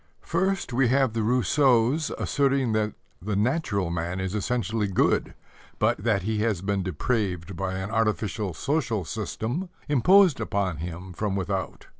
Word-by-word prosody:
First, 190 -4 -1
we 130 +1 +3
have 130 -1 +2
the 115 - -1
Rousseaus 125 +4 +3
asserting 135 -3 +1
that 110 -1 0 0.3
the 105 +3 -2
natural 105 - 0
man 85 +2 -2
is 95 0 -3
essentially 110 -1 -1
good, 95 - +1 0.4
but - - +2
that 100 -2 +1
he 110 +1 -1
has 105 -5 0
been 100 0 0
depraved 95 - -2
by 95 +2 -3
an 95 +2 -4
artificial 110 -4 -1
social 135 - -1
system 115 - -3 0.2
imposed 175 - +5
on 100 -5 -1
him 90 +3 -6
from 100 +2 -2
without. 95 0 -3
110 Hz, 145 wpm, -26 LUFS, 95-125 Hz, 0.4 s, imposed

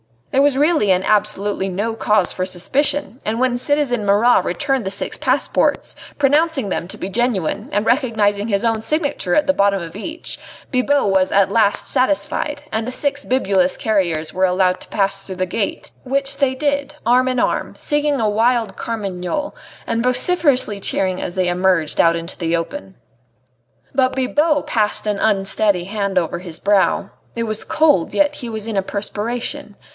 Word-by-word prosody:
There 270 - +3
was 280 -2 +3
really 295 - +3
and 185 +1 +2
absolutely 205 -2 0
no 205 +5 -2
cause 210 -4 +2
for 185 - -2
suspicion, 260 - -1
and 220 +2 -1
when 255 -1 +1
citizen 255 -4 0
Marat 210 +5 +4
returned 270 -6 -1
the - - -1
six 195 - -3
passports, - - 0 0.2
pronouncing 290 -4 +2
them 175 - -3
to - - -10
be 185 - -5
genuine, 210 - -1
and 205 +2 +1
recognising 220 -5 +1
his 200 -1 0
own 225 -1 +1
signature 285 - -1
at 300 - +3
the 280 - +2
bottom 200 -4 +2
of 165 +1 -9
each, 320 +11 -6 0.3
Bibot 275 0 +2
was 190 -1 +2
at 195 0 +3
last 205 -2 +2
satisfied, 290 +2 0
and 220 +1 -2
the - - -3
six 285 +1 -1
bibulous 195 -8 +1
carriers 170 -8 0
were 185 +1 +2
allowed 185 0 +1
to - - -12
pass 195 -1 -1
through 190 - -6
the 185 0 -1
gate, 200 +3 -3
which 275 +1 -2
they 275 -2 +1
did, 285 +1 -1
arm 250 +2 +4
in 255 0 0
arm, - - -1
singing 295 -1 0
a 215 - +2
wild 225 -1 +1
curmagnole, 205 - -4 0.3
and 230 0 -1
vociferously 255 - +2
cheering 190 -1 -1
as 175 - -5
they 185 -1 +1
emerged 180 -3 +1
out 165 0 +5
into 170 +1 -4
the 170 -1 -1
open. 190 - -5 1.0
But 260 -1 +1
Bibot 290 +3 +1
passed 215 -2 0
an 210 -2 -1
unsteady 200 -2 +1
hand 200 0 -3
over 175 -1 0
his 175 -3 -7
brow. 200 -1 +2 0.3
It 230 - -1
was 215 -1 -4
cold, 295 - +2
yet 295 0 +2
he 245 -4 -7
was 220 -2 -4
in 225 -3 -3
a - - +3
perspiration. 215 +5 -4
220 Hz, 175 wpm, -19 LUFS, 195-270 Hz, 1.0 s, out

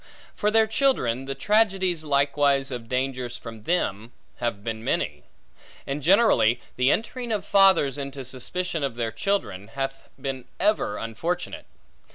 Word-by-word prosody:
For 210 - +1
their 220 +1 +5
children; 215 - +1
the 135 0 -4
tragedies 190 -1 +2
likewise 140 -1 +2
of 120 -3 -6
dangers 125 -2 -2
from 115 -3 -10
them, 115 - -1 0.2
have 115 -4 -2
been 110 0 -4
many. - - -1 0.6
And 140 +2 -3
generally, 175 - +4 0.2
the 125 +1 +3
entering 235 - -1
of 205 -3 -1
fathers 190 -9 +4
into 140 -1 -6
suspicion 160 +6 -3
of 135 -4 -2
their 115 -2 -2
children, 115 - -2
hath 135 +3 -5
been 135 -2 -4
ever 200 - +1
unfortunate. 170 +12 -4
140 Hz, 140 wpm, -25 LUFS, 120-185 Hz, 0.6 s, their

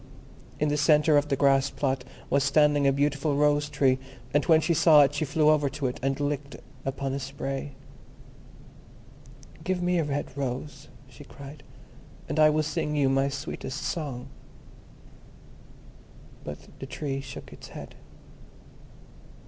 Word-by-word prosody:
In 150 - +1
the 145 - 0
centre 150 +1 +4
of 145 0 +3
the 140 - +1
grass 135 0 +3
plot 135 -2 -1 0.2
was 140 0 +2
standing 145 0 +3
a - - +5
beautiful 145 +1 0
Rose 145 0 +2
tree, 135 -2 +2 0.3
and 145 0 +3
when 160 -1 +6
she 170 +2 +1
saw 155 -2 +7
it 140 0 +1
she 155 - -1
flew 150 +1 +3
over 145 -2 +2
to 140 +1 -5
it, 125 - -2
and 135 +1 -1
lit 145 -1 -3 0.2
upon 135 0 -3
a 140 - -2
spray. 135 +1 -5 1.9
"Give 185 +1 -1
me 175 0 +2
a - - +2
red 145 -2 -3
rose," 135 +1 -5 0.2
she - - -13
cried, 140 +1 -11 0.7
"and 155 - -2
I 155 0 +7
will 155 0 +1
sing 150 0 -2
you 140 -2 +3
my 135 +1 +2
sweetest 135 -1 -5
song." 135 -7 -4 2.1
But 75 - -8
the 135 - -6
Tree 135 0 -4
shook 135 -1 -10
its - - -11
head. - - -10
145 Hz, 150 wpm, -27 LUFS, 135-150 Hz, 2.1 s, saw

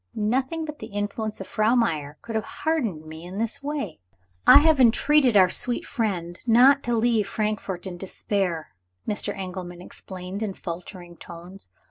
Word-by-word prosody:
Nothing 260 +9 0
but 300 -1 -8
the - - -7
influence 205 +1 -3
of - - -5
Frau 215 +3 +2
Meyer 155 - 0
could 230 - -6
have 220 -1 0 0.2
hardened 230 - 0
me 160 +1 -9
in 180 +2 -8
this 230 +6 -2
way! 280 - -4 0.5
"I - - +11
have 310 0 +4
entreated 255 0 +5
our 185 -2 +6
sweet 245 -1 0
friend 185 -9 -3
not 260 +5 +6
to 240 0 +1
leave 225 -2 +2
Frankfort 205 -4 -3
in 180 -2 -6
despair," 185 - -2 0.3
Mr. 205 -1 -1
Engelman 180 -2 -6
explained 185 +2 -7
in 205 -4 -3
faltering 175 0 -8
tones. 175 +4 -10
205 Hz, 160 wpm, -25 LUFS, 180-240 Hz, 0.5 s, I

